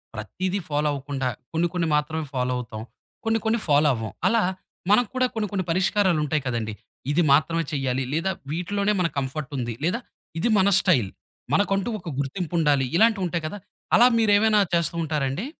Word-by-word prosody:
ప్రతీదీ 185 - -3
ఫాలో 150 +1 0
అవ్వకుండా 140 -1 -3 0.3
కొన్ని 165 +2 +2
కొన్ని 170 -2 0
మాత్రమే 155 +1 -1
ఫాలో 125 0 0
అవుతాం. 110 -3 -6 0.4
కొన్ని 225 0 +2
కొన్ని 225 +1 +2
ఫాలో 150 0 +4
అవ్వం. 110 -1 -5 0.2
అలా 225 +3 +3 0.5
మనక్కూడా 245 +4 +3
కొన్ని 215 -1 -1
కొన్ని 190 -3 -2
పరిష్కారాలుంటాయి 170 -5 +1
కదండీ. 115 -3 -2 0.4
ఇది 170 +4 +3
మాత్రమే 165 +3 +3
చేయాలి, 135 -2 -1
లేదా 165 +5 0 0.2
వీటిలోనే 200 +5 0
మన 175 - +2
కంఫర్ట్ 140 +2 -3
ఉంది. 120 -2 -3
లేదా 185 +9 +1 0.4
ఇది 235 - +1
మన 190 - +4
స్టైల్. 125 - +2 0.4
మనకంటూ 195 +1 +1
ఒక 175 - -7
గుర్తింపుండాలి. 150 -2 0
ఇలాంటివి 220 -1 +4
ఉంటాయి 170 -2 -2
కదా! 205 - -6 0.4
అలా 240 - +7
మీరు 220 -2 +3
ఏవైనా 215 0 +4
చేస్తూ 170 -1 +1
ఉంటారండి? 150 - -2
165 Hz, 160 wpm, -24 LUFS, 140-200 Hz, 0.5 s, అలా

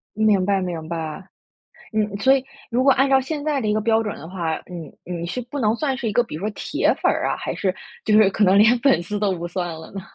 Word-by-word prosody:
明 210 -3 +3
白 200 0 +1
明 170 -4 -4
白。 165 +2 -5 0.6
嗯 210 -2 0
所 265 +5 +5
以 265 -1 0 0.3
如 245 +2 +1
果 275 - +5
按 270 +2 +2
照 270 -1 +5
现 290 +2 -4
在 295 -3 0
的 215 - -1
一 - - +2
个 215 - +1
标 225 +1 +2
准 210 -2 -4
的 160 - -10
话， 170 -4 -3
你 170 -4 -8
你 170 -1 -5
是 185 +9 -3
不 250 +4 -7
能 215 -2 +2
算 270 -1 -1
是 240 -3 -3
一 210 - -2
个 240 - +3
比 235 - -9
如 155 - -5
说 210 +3 -2
铁 - - 0
粉 - - +4
儿 - - 0
啊， - - -1
还 - - -4
是 190 -2 -1 0.3
就 215 - +2
是 215 -2 +6
可 205 +2 +2
能 190 +1 +5
连 220 +4 +6
粉 265 -9 +3
丝 205 +4 -4
都 200 -2 +1
不 170 0 -5
算 175 0 -3
了 160 0 -10
呢？ 195 - -5
210 Hz, 295 characters per minute, -22 LUFS, 180-245 Hz, 0.6 s, 是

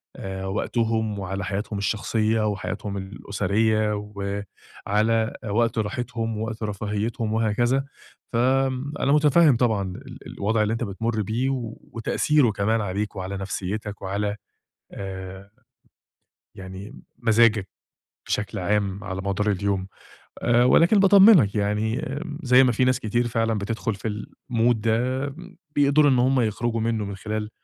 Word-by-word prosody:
آآ، 95 0 -6
وقتهم 110 +1 -1
وعلى 95 0 -4
حياتهم 105 +1 -3
الشخصية 110 +1 0
وحياتهم 100 0 -4
الأسرية، 105 +2 0 0.9
وعلى 110 +2 +2 0.2
وقت 115 +3 +1
راحتهم 115 +1 -2
ووقت 110 0 -4
رفاهيتهم 105 +2 -2
وهكذا، 120 +5 +1 0.5
ف - - -2
آمم 130 +3 +1
أنا 140 - +2
مُتفهم 150 -1 +5
طبعًا 115 -4 +2
ال 130 +2 -10
الوضع 110 +2 0
اللي 105 - 0
أنت 115 - -2
بتمر 110 +2 -2
بيه، 115 +6 -1 0.4
وتأثيره 125 +3 +2
كمان 110 +2 0
عليك 105 +1 -3
وعلى 95 +1 -4
نفسيتك 100 +1 -4
وعلى 100 +2 -2 0.6
آآ 95 0 -8 1.0
يعني 95 +2 -9 0.2
مزاجك 115 -3 +3 0.6
بشكل 105 - -2
عام 100 +1 -1
على 95 -2 -4
مدار 100 +2 0
اليوم، 100 -1 -1 0.5
آآ، 120 0 +4
ولكن 170 - +5
باطمنك 195 - +7
يعني 105 +4 0 0.4
زي 125 0 +6
ما 125 - +4
في 120 +2 +1
ناس 130 -1 +2
كتير 120 +2 0
فعلًا 115 -1 0
بتدخل 110 +1 -2
في 105 +3 -6
الmood 115 +3 -1
ده، 120 +5 0 0.5
بيقدروا 145 0 +4
إن 130 - +3
هم 130 +1 +3
يخرجوا 115 +1 -1
منه 110 -2 -1
من 100 0 -5
خلال 105 +2 -4
110 Hz, 130 wpm, -24 LUFS, 100-120 Hz, 1.0 s, باطمنك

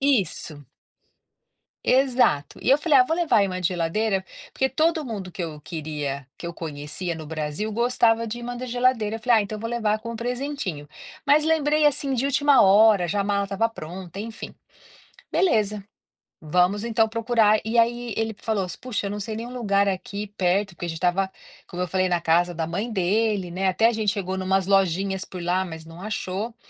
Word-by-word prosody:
Isso. 185 - 0 1.2
Exato. 255 - +2
E - - +2
eu 275 - +6
falei: 300 -2 +4
"Ah, 250 - +7
vou 320 - 0
levar 330 -9 +2
aí 200 - +4
imã 185 -2 -3
de 180 - +2
geladeira", 190 +3 -1 0.3
porque 265 0 +1
todo 315 +4 +1
mundo 205 -7 -5
que 180 0 -4
eu 155 -2 -7
queria 150 -4 -5
que - - -7
eu 170 - -6
conhecia 155 +3 -4
no 160 -1 -8
Brasil 155 +6 -3
gostava 230 0 +2
de 225 +2 -5
imã 245 0 -5
da 250 - -5
geladeira, 245 -3 +1
eu - - -11
falei: 235 0 +4
"Ah, - - +1
então 210 +1 -6
vou 230 +2 -4
levar 220 -3 0
com 230 +1 -6
presentinho". 245 - -4 0.4
Mas 295 +2 +5
lembrei, 305 -1 +2
assim, 280 -2 +2
de 250 +1 0
última 280 -1 +4
hora, 205 -1 +6
já 200 +4 -1
a - - 0
mala 200 0 +1
estava 200 +3 0
pronta, 180 -2 -9
enfim. 225 +2 -7 0.8
Beleza, 215 - +2 0.6
vamos 180 +7 +1
então 225 -1 +2
procurar, 225 -2 +3
e 225 +2 -1
aí 235 0 +2
ele 225 0 -1
falou: 215 -4 -1
"Puxa, 245 -5 -3
eu - - -4
não 205 - -4
sei 215 +2 -4
nenhum 235 +3 -6
lugar 200 -5 +1
aqui 200 +2 -4
perto", 190 +3 +1
porque 175 - -5
a - - -3
gente 165 - -4
estava, 180 +3 +1 0.4
como 180 - -5
eu 180 - -4
falei 185 +1 +1
na 175 -1 0
casa 175 +2 +2
da 165 0 -1
mãe 195 +8 -3
dele, 200 -1 0
né, 190 +2 -1
até 190 +5 +3
a - - +3
gente 215 -3 0
chegou 190 -3 -3
em - - -3
umas 190 0 +1
lojinhas 195 0 +1
por 180 -2 -8
lá 180 +2 +1
mas 160 -2 -8
não 165 +2 -12
achou. 210 +2 -4
205 Hz, 200 wpm, -24 LUFS, 180-235 Hz, 1.2 s, Ah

